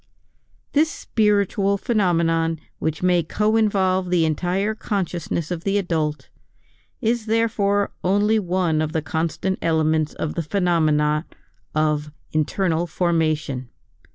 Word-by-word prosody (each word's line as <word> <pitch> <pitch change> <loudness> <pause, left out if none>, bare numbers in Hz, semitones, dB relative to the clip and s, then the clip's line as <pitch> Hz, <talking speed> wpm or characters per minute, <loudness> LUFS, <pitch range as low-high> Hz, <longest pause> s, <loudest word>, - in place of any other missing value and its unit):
This 310 +2 +3
spiritual 200 - +1
phenomenon 165 - +1 0.2
which 160 +2 -2
may 180 -1 +4
co 210 +7 0
involve 190 -4 +2
the 175 -2 +3
entire 180 +7 0
consciousness 175 -6 -3
of 170 -2 -3
the 200 +1 +1
adult, 160 -5 -2 0.7
is 230 -1 0
therefore 210 -3 +1
only 205 +4 +3
one 175 -4 0
of 155 +1 -2
the 160 -3 -1
constant 170 +4 -2
elements 155 -1 +1
of 155 - -3
the 170 - -2
phenomena 155 -3 +1 0.5
of 150 -1 0 0.2
"internal 165 +2 0
formation." 155 -7 0
175 Hz, 115 wpm, -22 LUFS, 160-200 Hz, 0.7 s, may